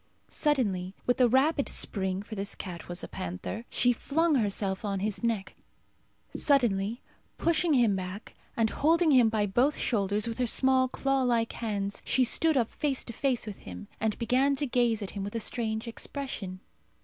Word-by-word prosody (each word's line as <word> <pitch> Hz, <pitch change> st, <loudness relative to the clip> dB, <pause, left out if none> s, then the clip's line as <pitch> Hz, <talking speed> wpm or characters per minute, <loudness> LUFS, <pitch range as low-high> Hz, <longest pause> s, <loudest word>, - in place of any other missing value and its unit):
Suddenly 200 Hz, -, 0 dB
with 245 Hz, +1 st, +2 dB
a 245 Hz, -, +6 dB
rapid 280 Hz, +4 st, +2 dB
spring, 190 Hz, -1 st, -1 dB
for 220 Hz, -, -10 dB
this 200 Hz, -1 st, -2 dB
cat 175 Hz, -3 st, -7 dB
was 175 Hz, +1 st, -5 dB
a -, -, -5 dB
panther, 90 Hz, -, -5 dB
she 245 Hz, 0 st, +3 dB
flung 320 Hz, +7 st, +1 dB
herself 200 Hz, -5 st, 0 dB
on 200 Hz, -2 st, -1 dB
his 210 Hz, +3 st, -3 dB
neck. 215 Hz, -5 st, -1 dB, 0.8 s
Suddenly, 235 Hz, -6 st, +1 dB, 0.3 s
pushing 335 Hz, -1 st, +2 dB
him 235 Hz, -7 st, +4 dB
back, 185 Hz, +3 st, -6 dB, 0.2 s
and 225 Hz, -2 st, +2 dB
holding 325 Hz, +2 st, +3 dB
him 250 Hz, -5 st, +6 dB
by 215 Hz, -2 st, +1 dB
both 245 Hz, +9 st, +2 dB
shoulders 205 Hz, -2 st, 0 dB
with 230 Hz, +1 st, -4 dB
her 250 Hz, -, +1 dB
small 260 Hz, +2 st, +3 dB
claw 270 Hz, +1 st, 0 dB
like 235 Hz, -3 st, +1 dB
hands, 205 Hz, -3 st, -3 dB
she 260 Hz, -, +2 dB
stood 310 Hz, +5 st, +3 dB
up 235 Hz, -3 st, +1 dB
face 280 Hz, -3 st, -1 dB
to 235 Hz, -, -8 dB
face 255 Hz, 0 st, 0 dB
with 210 Hz, -3 st, -7 dB
him, 90 Hz, -1 st, -9 dB
and 220 Hz, -1 st, 0 dB
began 260 Hz, +4 st, +2 dB
to 290 Hz, -, -1 dB
gaze 240 Hz, -4 st, +1 dB
at 195 Hz, -, -6 dB
him 200 Hz, -, -5 dB
with 205 Hz, +3 st, -6 dB
a -, -, 0 dB
strange 220 Hz, 0 st, -2 dB
expression. 225 Hz, -6 st, -6 dB
230 Hz, 180 wpm, -29 LUFS, 200-265 Hz, 0.8 s, a